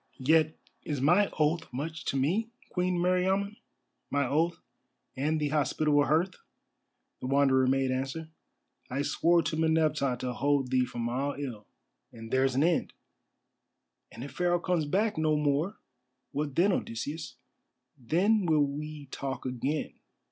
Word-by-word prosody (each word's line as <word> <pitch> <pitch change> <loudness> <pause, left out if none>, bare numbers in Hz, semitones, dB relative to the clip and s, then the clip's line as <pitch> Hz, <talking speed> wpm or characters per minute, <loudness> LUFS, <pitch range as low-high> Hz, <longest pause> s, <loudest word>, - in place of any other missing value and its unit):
"Yet 155 +3 +3 0.2
is 145 -3 -3
my 175 +9 +4
oath 155 0 +1
much 160 +5 -5
to 135 - -1
me, 185 +12 +1 0.2
Queen 180 0 0
Meriamun—my 185 -5 -1
oath 160 +5 +1 0.6
and 155 +4 0
the 150 -1 0
hospitable 150 0 +2
hearth," 165 +5 +2 0.9
the - - -5
Wanderer 135 -1 +3
made 135 0 +2
answer. 135 +5 -3 0.6
"I 135 +3 -1
swore 170 +3 +3
to 155 - -2
Meneptah 155 -5 +2
to 125 -1 -2
hold 140 -1 +1
thee 130 -1 +3
from 120 -1 -4
all 135 +4 -1
ill, 120 -7 -6 0.4
and 115 -1 -10
there's 130 0 +2
an 135 - +3
end." 170 +1 +1 1.2
"And 120 - -8
if 140 - -7
Pharaoh 175 +4 +1
comes 175 -3 0
back 205 +5 0
no 155 -1 +2
more, 150 +6 0 0.5
what 145 -1 -3
then 190 +4 +4
Odysseus?" 150 +1 -4 0.6
"Then 180 - +2
will 155 -3 +4
we 150 +1 -6
talk 135 -1 -4
again. 130 +4 -3
150 Hz, 140 wpm, -29 LUFS, 135-165 Hz, 1.2 s, my